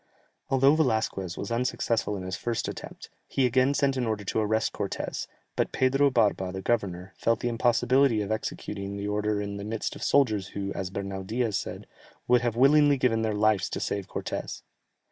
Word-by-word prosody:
Although 135 +2 +5
Velasquez 110 - 0
was 100 - -5
unsuccessful 115 -3 0
in 95 - -6
his 95 0 -3
first 115 +4 -2
attempt, - - -8 0.2
he 135 - +1
again 130 +3 +3
sent 135 -1 +1
an 125 -2 0
order 110 -2 -2
to 100 - -1
arrest 110 +1 +1
Cortès, 100 -1 -4 0.3
but - - 0
Pedro 135 +2 +3
Barba 105 -7 +1
the 95 +1 -6
governor, 95 -5 -1
felt 115 0 +1
the 120 - 0
impossibility 120 0 +3
of 100 - -5
executing 100 -2 -4
the 100 0 -3
order 105 0 0
in 100 0 -4
the 100 - -6
midst 110 +1 -3
of - - -10
soldiers 110 -9 +2
who, 100 +1 -4
as 95 -2 -4
Bernal 95 0 -4
Diaz 110 +1 -1
says, - - -6 0.4
"would 120 -2 +3
willingly 145 +3 +5
have - - -7
given 115 -3 +2
their 110 -2 0
lives 105 -2 +2
to - - -3
save 100 -2 -2
Cortès." - - -5
110 Hz, 185 wpm, -27 LUFS, 100-125 Hz, 0.4 s, Although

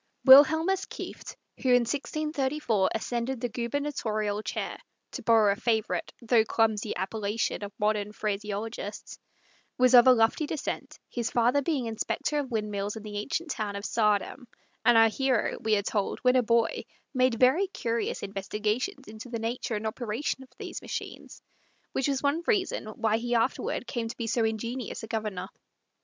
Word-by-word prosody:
Wilhelmus 315 +8 +7
Kieft, - - -8 0.3
who 260 - 0
in 245 0 +6
1634 280 -4 -1
ascended 240 +3 -2
the 245 0 -2
gubernatorial 225 -4 -2
chair - - -4 0.3
(to - - -6
borrow 220 -3 +5
a - - 0
favorite 225 0 -1
though 230 -1 +4
clumsy 220 -1 0
appellation 205 +3 -2
of 200 - -5
modern 210 -1 0
phraseologists), 210 +1 -4 0.6
was 255 0 +4
of 245 0 +9
a - - +10
lofty 235 +5 +3
descent, 310 -1 -4
his 235 -2 -3
father 245 +4 +3
being 280 -4 -1
inspector 230 +6 -1
of 275 -3 -3
windmills 210 -3 -2
in 220 - -8
the 205 -1 -5
ancient 305 +8 -3
town 205 -2 -3
of 200 +1 -5
Saardam; 215 +3 0 0.4
and 240 - +6
our 225 0 +7
hero, 255 +1 0
we 220 -1 +2
are 200 - 0
told, 205 -1 -1
when 250 0 +4
a 255 - +5
boy, 230 0 +1 0.3
made 255 -2 +3
very 285 +10 +4
curious 230 -10 -2
investigations 210 - -3
into 220 +3 -9
the 235 - -3
nature 230 0 -3
and 210 +1 -4
operations 235 +5 -3
of - - -30
these - - -6
machines, - - -7 0.5
which 265 - 0
was 275 -1 -1
one 285 +4 +1
reason 385 - 0
why 220 0 0
he 240 +1 -1
afterward 235 +1 0
came 235 -1 -3
to 225 - -7
be 230 - -3
so 230 +1 +1
ingenious 230 +3 -3
a - - -6
Governor. 215 -5 -3
230 Hz, 165 wpm, -28 LUFS, 215-260 Hz, 0.6 s, a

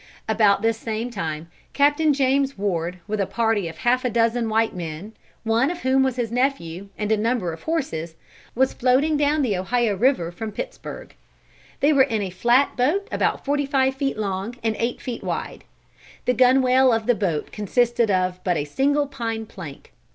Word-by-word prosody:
About 210 -2 +3
this 225 0 +1
same 230 +2 -3
time 160 -7 -4 0.3
Captain 290 +2 +3
James 275 -1 +1
Ward, 180 -3 -2
with 215 -1 -1
a 195 - 0
party 225 -5 0
of 165 -1 -8
half 245 +7 +1
a 250 - +1
dozen 230 0 +1
white 225 -1 +1
men, 170 +4 -6 0.3
one 230 +4 +2
of 350 0 -5
whom 260 +1 +3
was 265 -2 +1
his 240 -3 -2
nephew, 215 -8 -1
and 210 0 -2
a 220 - +3
number 215 -6 0
of 160 - -10
horses, 170 - -3 0.4
was 260 +2 +2
floating 265 +5 +2
down 295 0 +2
the 220 -6 +1
Ohio 220 +3 0
River 200 -6 +1
from 220 +4 -6
Pittsburgh. - - -7 0.7
They 295 +2 +4
were 280 - +5
in 220 -5 +1
a 190 - -4
flat 240 +9 +2
boat 315 +11 +1
about - - 0
forty 285 0 0
five 265 -1 +2
feet 270 -3 -2
long 200 +2 -3
and 220 -1 0
eight 235 +1 -1
feet 245 -2 -6
wide. - - -4 0.6
The 250 - +2
gunwale 255 +1 +4
of 225 -1 0
the 245 - +4
boat 180 -9 -2
consisted 235 +2 +1
of 185 -1 0
but 180 -3 +1
a 145 - -2
single 285 - +1
pine 230 -5 -4
plank. 170 -10 -11
230 Hz, 185 wpm, -23 LUFS, 200-265 Hz, 0.7 s, were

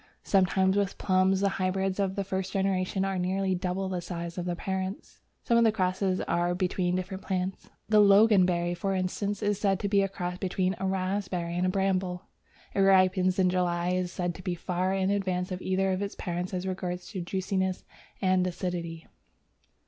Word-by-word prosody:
Sometimes 190 0 +3
with 200 -1 0
plums, 190 0 +2
the 200 - +3
hybrids 190 +1 0
of 195 -1 0
the 200 - -1
first 190 -1 -3
generation 190 -1 0
are 195 -1 -1
nearly 190 +1 0
double 185 +1 -2
the 185 -2 -3
size 170 -1 -5
of 180 - -4
their 175 -1 -1
parents. 190 +2 -4 0.2
Some 235 0 +3
of - - +5
the 225 - +5
crosses 185 -2 0
are 175 +1 0
between 180 -1 0
different 185 +1 -4
plants. 185 0 -3 0.2
The 215 0 +5
Loganberry, 190 -4 +5
for 195 +2 -1
instance, 200 +2 -2
is 205 -1 +1
said 195 -3 +1
to 200 - -1
be 200 0 +3
a 195 - +1
cross 180 -1 -4
between 185 -1 0
a 190 - -1
Raspberry 185 -2 -2
and 180 +1 +1
a - - +2
Bramble. 185 -1 0 0.5
It - - -1
ripens 185 -1 +4
in 185 -1 +3
July, 175 -1 0
and 180 - +1
is 175 - -8
said 175 -2 -2
to 185 - -10
be 180 -1 -2
far 180 +1 -1
in 190 0 +1
advance 185 -2 -1
of 185 0 -4
either 190 +1 +1
of 185 +1 -1
its 200 0 -4
parents 175 0 -3
as 185 -1 -3
regards 180 -1 -4
juiciness 190 0 -2 0.4
and 185 -1 +3
acidity. 170 -2 -4
185 Hz, 190 wpm, -28 LUFS, 180-195 Hz, 0.5 s, of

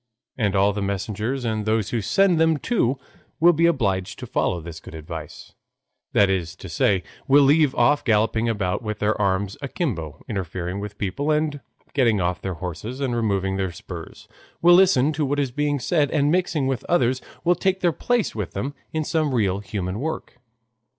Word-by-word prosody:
And 105 -5 0
all 100 +1 +3
the 105 - -3
messengers 105 +6 -2
and 110 -2 -1
those 110 -1 0
who 115 - 0
send 185 - +3
them 160 -1 +4
too 140 - 0 0.4
will 175 +2 +6
be 165 +2 +3
obliged 100 - 0
to - - -7
follow 90 - 0
this 80 -1 -8
good 80 - -11
advice, 80 -1 -8 0.6
that 100 - +5
is 95 -3 -1
to 95 - -10
say, 90 +3 +2 0.2
will 140 +1 +6
leave 145 0 +4
off 120 +5 +3
galloping 110 0 +2
about, 100 -5 -1
with 105 -2 -4
their 105 +1 +1
arms 100 0 0
akimbo, 115 - -3
interfering 95 -3 -4
with 105 0 -7
people, 135 +10 -2
and 150 -1 +1 0.3
getting 115 -7 +3
off 90 0 -1
their 95 -2 -3
horses 90 - -6
and 130 -4 -1
removing 100 -4 0
their 95 -2 -1
spurs, 85 - -10 0.3
will 175 +1 +6
listen 175 -6 +5
to 150 +1 -1
what 145 +1 0
is 135 -3 0
being 145 +2 0
said, 150 +1 +1
and 145 -1 +2
mixing 175 -5 +1
with 130 -3 -1
others, 130 -6 +2 0.2
will 175 - +4
take 190 +2 0
their 175 - +3
place 245 +3 0
with 105 -5 -4
them 135 +9 -3 0.2
in 155 0 -1
some 155 -3 0
real 100 -4 +1
human 100 -1 -4
work. 155 -3 -5
115 Hz, 185 wpm, -23 LUFS, 95-145 Hz, 0.6 s, will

